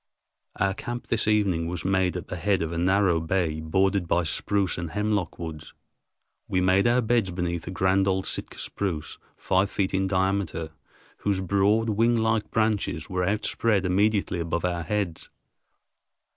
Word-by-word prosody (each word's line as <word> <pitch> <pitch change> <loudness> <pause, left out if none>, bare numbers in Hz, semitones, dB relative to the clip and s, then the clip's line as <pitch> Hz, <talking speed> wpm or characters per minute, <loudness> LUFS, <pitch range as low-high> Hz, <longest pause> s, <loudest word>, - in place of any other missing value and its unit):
Our 95 0 +1
camp 120 +4 -6
this 110 -2 +1
evening 100 -6 +2
was 85 -1 -5
made 95 -1 +1
at 90 - -6
the - - -5
head 95 +1 +1
of 80 - -3
a 85 - -3
narrow 95 -1 +3
bay 80 -2 0
bordered 95 +3 +1
by 85 +1 +2
spruce 95 +4 0
and 85 -1 -4
hemlock 105 -3 -1
woods. 80 -2 -8 0.7
We 90 - 0
made 95 +3 +3
our 120 +1 +3
beds 115 -3 +2
beneath 85 -2 -3
a - - -3
grand 95 +1 +2
old 95 0 +1
Sitka - - -4
spruce 90 -7 -3 0.2
five 95 +1 +1
feet 95 -2 -1
in 95 0 +1
diameter, 95 -4 -1 0.5
whose 100 -2 -1
broad, 100 +4 +2
winglike 110 0 +2
branches 110 -8 -1
were 90 0 0
outspread 105 +1 +1
immediately 100 0 +1
above 85 +1 -2
our 85 -1 -1
heads. 95 -3 -3
95 Hz, 160 wpm, -26 LUFS, 85-105 Hz, 0.7 s, narrow